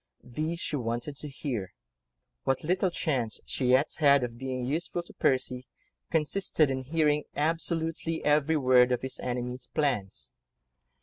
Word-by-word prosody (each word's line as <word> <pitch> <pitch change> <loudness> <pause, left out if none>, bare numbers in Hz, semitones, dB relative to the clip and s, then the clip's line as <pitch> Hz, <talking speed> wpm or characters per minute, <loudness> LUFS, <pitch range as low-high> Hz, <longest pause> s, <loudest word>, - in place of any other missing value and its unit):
These 155 +7 -3
she 150 - -2
wanted 120 +3 -3
to 150 - -6
hear: 125 - -4 0.7
what 135 -1 0
little 185 +4 +2
chance 130 -10 -1
she 130 - -1
yet 130 +4 +4
had, 140 -3 +6
of 120 -1 -4
being 130 -1 -3
useful 165 +5 -2
to - - -14
Percy, 130 -1 0 0.4
consisted 160 -2 +1
in 130 0 -3
hearing 150 0 +2
absolutely 165 +1 -1
every 150 +1 +3
word 125 -2 +5
of 125 - 0
his 130 - -4
enemy's 125 0 -4
plans. 125 -10 -1
140 Hz, 140 wpm, -29 LUFS, 125-155 Hz, 0.7 s, had